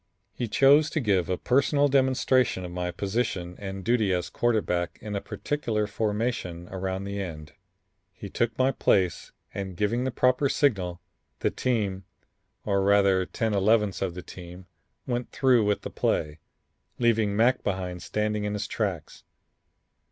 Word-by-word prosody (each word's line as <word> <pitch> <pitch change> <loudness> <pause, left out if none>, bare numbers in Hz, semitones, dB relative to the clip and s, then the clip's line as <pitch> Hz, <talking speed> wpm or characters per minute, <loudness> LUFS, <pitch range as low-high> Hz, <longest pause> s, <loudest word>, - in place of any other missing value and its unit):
He 120 - -3
chose 140 +6 +5
to - - -1
give 100 - +1
a 90 - 0
personal 140 +2 +2
demonstration 130 -6 +2
of 90 - -7
my 90 0 -3
position 95 -1 -2
and 95 -1 -6
duty 115 -4 +2
as 90 -1 -2
quarterback 105 -7 0
in 105 -1 -5
a 100 - -2
particular 115 -8 -2
formation 105 -5 -2
around 95 0 -3
the 100 0 -4
end. 75 -5 -7 0.6
He - - -9
took 115 -1 -1
my 130 +1 +3
place 95 -7 +1 0.2
and 95 -3 -5
giving 115 +4 0
the 130 - 0
proper 130 +2 +2
signal, 95 -13 0 0.4
the - - +1
team 100 -7 -1 0.6
or 100 -2 +1
rather 100 -2 +3
ten 110 0 -1
elevenths 105 0 +2
of 90 -3 -2
the 90 - -7
team 90 +1 -11 0.4
went 120 -1 -3
through 125 -5 +3
with 105 0 0
the - - -6
play, 75 +1 -1 0.6
leaving 115 -4 +2
Mac 120 +4 +3
behind 90 -2 -3
standing 105 +2 -1
in 105 0 -2
his 105 0 -2
tracks. 100 -7 -4
105 Hz, 150 wpm, -26 LUFS, 95-120 Hz, 0.6 s, chose